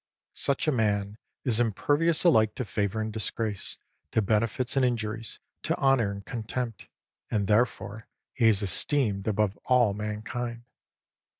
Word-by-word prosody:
Such 140 +2 0
a - - +4
man 105 -3 0 0.2
is 120 -3 +2
impervious 145 +8 +2
alike 110 - +4
to 125 - -3
favour 100 +1 -1
and 110 0 -4
disgrace, 110 -1 -2 0.4
to 110 - +3
benefits 115 +5 +1
and 135 - +3
injuries, 115 -2 -2 0.2
to - - -1
honour 135 -6 +3
and 100 0 -7
contempt. 115 -2 -5 0.4
And 105 -3 0
therefore 110 0 0 0.3
he 120 -3 +3
is 105 -2 +4
esteemed 100 - +2
above 105 -1 +1
all 125 -5 +4
mankind. 110 +3 -4
110 Hz, 135 wpm, -27 LUFS, 105-125 Hz, 0.4 s, a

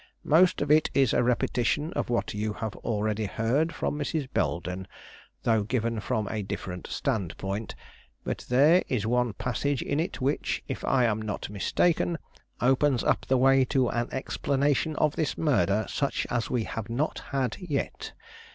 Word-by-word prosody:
"Most 175 +3 +4
of 145 - -1
it 155 0 +5
is 135 -4 +4
a - - +3
repetition 125 +5 +1
of - - -2
what 120 - 0
you 105 +1 -2
have 110 -1 -5
already 110 0 -1
heard 130 +11 +1
from 150 -1 -2
Mrs. 145 -1 -2
Belden, 90 +2 -1 0.6
though 110 -2 +3
given 115 +1 -1
from 110 -1 -1
a 110 - -2
different 95 -2 -5
standpoint; 100 +1 -3 0.5
but - - -3
there 145 +8 +6
is 110 -5 -1
one 120 0 +1
passage 130 +5 -1
in 145 - -1
it 170 +4 -2
which, 135 +3 -1
if - - -5
I 130 -2 +3
am 110 -1 +1
not 105 -2 -4
mistaken, 165 - +1 0.4
opens 135 0 +3
up - - +1
the 130 - +3
way 135 +1 +5
to 130 -2 +1
an 120 0 -1
explanation 140 +3 0
of 150 0 +1
this 160 - -1
murder 110 - +2
such 140 - -1
as 120 -3 -1
we 120 -3 0
have 110 0 -5
not 135 +7 -1
had 135 -3 -1
yet. 160 -7 -3
125 Hz, 165 wpm, -27 LUFS, 110-145 Hz, 0.6 s, there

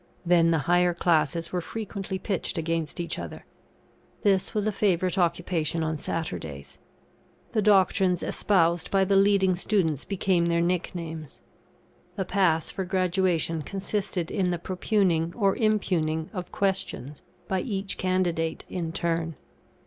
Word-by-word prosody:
Then 170 -1 +4
the 165 - +3
higher 175 0 +3
classes 170 0 +1
were 180 - -1
frequently 200 -1 -5
pitched 190 -2 -3
against 165 -1 -2
each 170 - -2
other. - - -8 0.8
This 195 +1 +2
was 210 -1 +1
a 215 - +2
favourite 185 -3 +1
occupation 170 -2 0
on 155 -1 -2
Saturdays. 80 - -5 0.7
The 215 - +1
doctrines 190 -3 +3
espoused 170 -4 +1
by 195 -1 +3
the 195 +1 +2
leading 195 -1 +4
students 175 -6 +1
became 185 -3 +1
their 170 0 +2
nicknames. 170 -3 -3 0.7
The 190 - -2
pass 180 -5 +2
for 190 - -3
Graduation 180 -3 +1
consisted 195 0 -2
in 190 -3 +1
the 175 - 0
propugning 180 -2 0
or 200 -4 +2
impugning 170 -8 0
of 180 -3 -5
questions 185 -8 -2 0.3
by 190 -1 0
each 195 -3 -3
candidate 175 -3 0
in 170 -3 -3
turn. 165 -1 -1
180 Hz, 135 wpm, -26 LUFS, 165-195 Hz, 0.8 s, Then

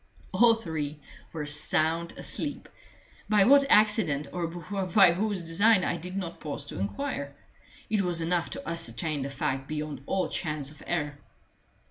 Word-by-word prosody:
All 235 -1 +5
three 155 -8 -4 0.3
were 155 -2 -4
sound 155 +3 +1
asleep, - - -3 0.6
by 210 -2 +5
what 275 +5 +6
accident 210 - +3
or 175 -2 -2
by 185 +2 +2
whose 200 +1 -1
design 185 +5 +3
I 170 - -1
did 180 +3 -6
not 175 -3 -5
pause 145 -2 -5
to 145 - -7
inquire; 140 - -4 0.5
it 210 -1 +1
was 175 -3 +2
enough 165 -3 0
to - - -7
ascertain 165 -2 -1
the 135 - -3
fact 135 0 -3
beyond 150 -3 -4
all 190 -1 0
chance 150 -4 -2
of 150 - -15
error. 145 -4 -2
165 Hz, 150 wpm, -28 LUFS, 150-195 Hz, 0.6 s, what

